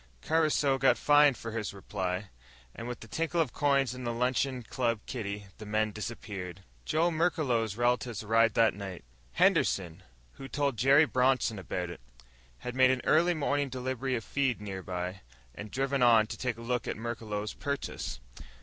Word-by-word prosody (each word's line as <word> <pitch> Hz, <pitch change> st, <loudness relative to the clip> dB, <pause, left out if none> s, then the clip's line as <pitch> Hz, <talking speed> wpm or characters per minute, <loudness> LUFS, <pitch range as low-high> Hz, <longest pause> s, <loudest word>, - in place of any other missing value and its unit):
Caruso 155 Hz, -4 st, +2 dB
got 135 Hz, -, +4 dB
fined 145 Hz, -2 st, +5 dB
for 115 Hz, -, -6 dB
his 110 Hz, -3 st, -4 dB
reply, 95 Hz, 0 st, -4 dB, 0.4 s
and 115 Hz, -, -7 dB
with 120 Hz, -1 st, -6 dB
the 115 Hz, -, -10 dB
tinkle 165 Hz, +7 st, -1 dB
of 150 Hz, -8 st, +1 dB
coins 140 Hz, -3 st, +2 dB
in 125 Hz, 0 st, -7 dB
the 120 Hz, -, -1 dB
luncheon 125 Hz, +1 st, 0 dB
club 115 Hz, -1 st, -1 dB
kitty 105 Hz, -4 st, -5 dB
the 110 Hz, -, -8 dB
men 110 Hz, 0 st, +1 dB
dispersed. 100 Hz, -4 st, -6 dB, 0.2 s
Joe 165 Hz, -, +2 dB
Merklos' 135 Hz, -, 0 dB
relatives 120 Hz, -2 st, 0 dB
arrived 115 Hz, +1 st, +3 dB
that 115 Hz, -1 st, +4 dB
night. 95 Hz, -5 st, -7 dB, 0.3 s
Henderson, 90 Hz, -2 st, +2 dB, 0.4 s
who 135 Hz, -, -7 dB
told 140 Hz, -2 st, 0 dB
Jerry 135 Hz, +7 st, +6 dB
Bronson 130 Hz, -5 st, +1 dB
about 90 Hz, -1 st, -4 dB
it, 85 Hz, -, -10 dB, 0.6 s
had 125 Hz, -, -3 dB
made 130 Hz, 0 st, +5 dB
an 130 Hz, -1 st, +1 dB
early 170 Hz, +3 st, +4 dB
morning 145 Hz, -2 st, 0 dB
delivery 130 Hz, 0 st, -2 dB
of 115 Hz, -, -3 dB
feed 135 Hz, -3 st, 0 dB
nearby, 95 Hz, -2 st, -5 dB, 0.3 s
and 105 Hz, +9 st, -8 dB
driven 135 Hz, +3 st, -1 dB
on 115 Hz, -3 st, +6 dB
to -, -, -6 dB
take 125 Hz, -3 st, -3 dB
a -, -, -9 dB
look 125 Hz, +1 st, -1 dB
at -, -, -3 dB
Merklos' 110 Hz, -2 st, -4 dB
purchase. 140 Hz, -, -4 dB
120 Hz, 165 wpm, -30 LUFS, 105-135 Hz, 0.6 s, Jerry